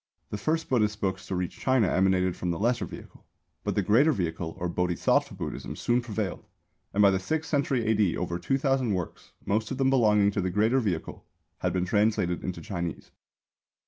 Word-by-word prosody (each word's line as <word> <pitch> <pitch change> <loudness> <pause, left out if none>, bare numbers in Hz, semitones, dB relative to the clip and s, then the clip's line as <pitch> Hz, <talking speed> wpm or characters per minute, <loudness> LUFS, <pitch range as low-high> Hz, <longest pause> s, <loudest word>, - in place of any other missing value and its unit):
The 105 - -2
first 160 +9 0
Buddhist 105 -4 +1
books 95 -1 -2
to 95 - -2
reach 90 -1 -3
China 130 -6 +3
emanated 95 -1 +2
from 90 - -3
the 85 - -1
Lesser 120 +5 +1
Vehicle. - - -12 0.4
But - - -2
the - - +2
Greater 135 +9 +4
Vehicle 85 - -3
or 90 - -2
Bodhisattva 90 0 +1
Buddhism - - -5
soon 120 +1 +1
prevailed, 110 -5 -4 0.5
and 105 - +3
by 100 - +7
the 95 - +1
sixth 160 +10 -3
century 140 -5 +1
A.D. 105 -5 +2
over 85 0 -2
two 135 - 0
thousand 135 -6 +1
works, 90 -3 -6
most 110 +2 0
of 135 - -4
them 135 0 +2
belonging 105 -5 +4
to 100 - -1
the 95 - -1
Greater 110 +7 +2
Vehicle, 95 -9 -3 0.4
had - - 0
been 90 -1 0
translated 105 -3 +1
into 90 -1 -4
Chinese. 85 -5 -5
105 Hz, 190 wpm, -27 LUFS, 90-120 Hz, 0.5 s, by